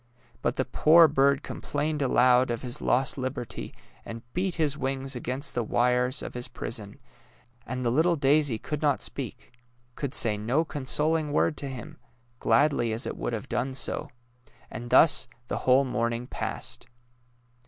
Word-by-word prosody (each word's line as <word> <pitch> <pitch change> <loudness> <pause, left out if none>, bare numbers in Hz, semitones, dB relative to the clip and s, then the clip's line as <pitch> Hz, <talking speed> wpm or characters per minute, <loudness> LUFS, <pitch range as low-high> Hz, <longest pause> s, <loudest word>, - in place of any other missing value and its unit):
But - - 0
the - - 0
poor 165 +2 +6
bird 140 0 +2
complained 150 +1 -3
aloud 125 -1 +4
of 120 +1 -3
Ms 125 +2 -3
lost 135 +2 +1
liberty, 130 -3 -5 0.3
and 115 0 -8
beat 180 0 -1
his 155 -3 +1
wings 135 -1 -3
against 125 +3 -3
the 120 - 0
wires 125 +3 +1
of - - -6
his 125 0 -4
prison; 105 -3 -6 0.7
and 125 0 -3
the 120 - +2
little 165 +6 +3
daisy 140 -3 +2
could 150 +6 -5
not 145 -3 +1
speak - - -5 0.2
— 120 +1 -38
could 140 0 -4
say 105 -2 +3
no 125 +10 +1
consol 150 +3 0
ing 150 -2 -4
word 150 +1 +2
to 140 - -5
him, 130 -3 -8 0.4
gladly 120 0 +2
as 110 - -1
it - - -4
would - - -3
have - - -4
done 130 +1 -2
so. 150 +3 -2 0.6
And 120 +1 -7
thus 160 - +5 0.2
the - - -3
whole 135 +2 +5
morning 120 -1 -1
passed. - - -6
130 Hz, 165 wpm, -27 LUFS, 120-150 Hz, 0.7 s, poor